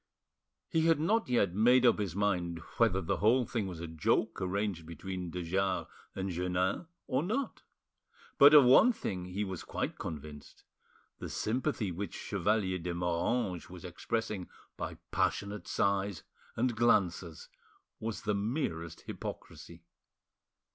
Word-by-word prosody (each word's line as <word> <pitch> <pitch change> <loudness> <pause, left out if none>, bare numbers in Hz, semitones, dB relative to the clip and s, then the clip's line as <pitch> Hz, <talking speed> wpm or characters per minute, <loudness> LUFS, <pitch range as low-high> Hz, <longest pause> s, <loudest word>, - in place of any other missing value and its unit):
He 160 0 +2
had 165 -3 +4
not 215 - +1
yet 100 -7 +2
made 120 +5 +5
up 120 - +5
his 95 -5 -2
mind 90 -4 0 0.2
whether 100 -5 +3
the 80 - -1
whole 120 +4 +4
thing 110 -3 -2
was 90 -3 -6
a 85 - -4
joke 80 -1 0
arranged 95 -3 -2
between 90 +2 -5
de 90 +1 -4
Jars 95 +2 0 0.3
and 95 0 -2
Jeannin 90 - -1 0.2
or 130 - 0
not, 230 - -2 0.8
but 145 +2 +9
of 145 -3 +9
one 175 - +7
thing 90 - -4
he 95 +3 -3
was 95 -4 -5
quite - - -4
convinced, 75 -1 -8 0.6
the - - -6
sympathy 115 -3 -1
which 95 +4 -5
Chevalier 100 -1 0
de 85 0 -3
Moranges 90 +3 -1
was 90 0 -10
expressing 105 +2 -3 0.3
by - - -5 0.2
passionate 100 +1 -1
sighs 100 -5 0 0.3
and 120 0 +1
glances 120 - +1 0.5
was 110 -3 -4
the 105 - +1
merest 100 - -2
hypocrisy. 85 0 -8
100 Hz, 140 wpm, -32 LUFS, 90-115 Hz, 0.8 s, but